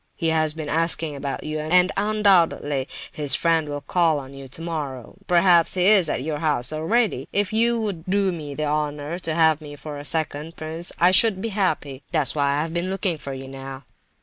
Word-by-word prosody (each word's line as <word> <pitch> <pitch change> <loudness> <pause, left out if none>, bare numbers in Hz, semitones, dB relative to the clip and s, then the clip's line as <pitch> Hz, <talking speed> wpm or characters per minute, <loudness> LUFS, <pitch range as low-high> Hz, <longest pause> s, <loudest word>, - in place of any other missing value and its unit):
He 165 - -1
has 155 -1 +1
been 155 -2 -6
asking 165 -1 0
about 140 0 -5
you, 155 0 -4
and 180 +4 +3
undoubtedly 190 -10 +2 0.2
his 145 -4 +3
friend 165 -3 +1
will 145 0 -4
call 165 -2 +1
on 135 -1 -8
you 135 -1 -10
tomorrow—perhaps 165 - 0
he 180 -1 +1
is 195 -5 +5
at 130 - -2
your 150 0 -3
house 150 -3 0
already. 205 +9 0
If 205 0 0
you 235 +1 +2
would 195 -7 -4
do 195 0 +1
me 150 -5 -7
the 155 - -2
honour 150 +2 -2
to 165 -3 -2
have 160 -2 +3
me 145 -1 -9
for 145 0 -8
a - - -8
second, 155 +1 -1
prince, 160 +2 0
I 175 +2 +4
should 195 +1 +4
be 230 - -3
happy. 155 -9 -2
That's 155 -5 +3
why 145 -2 0
I 145 - 0
have 165 0 -6
been 175 +2 -2
looking 190 -4 0
for 140 -1 -6
you 135 0 -8
now." 135 0 -9
160 Hz, 200 wpm, -23 LUFS, 145-180 Hz, 0.2 s, is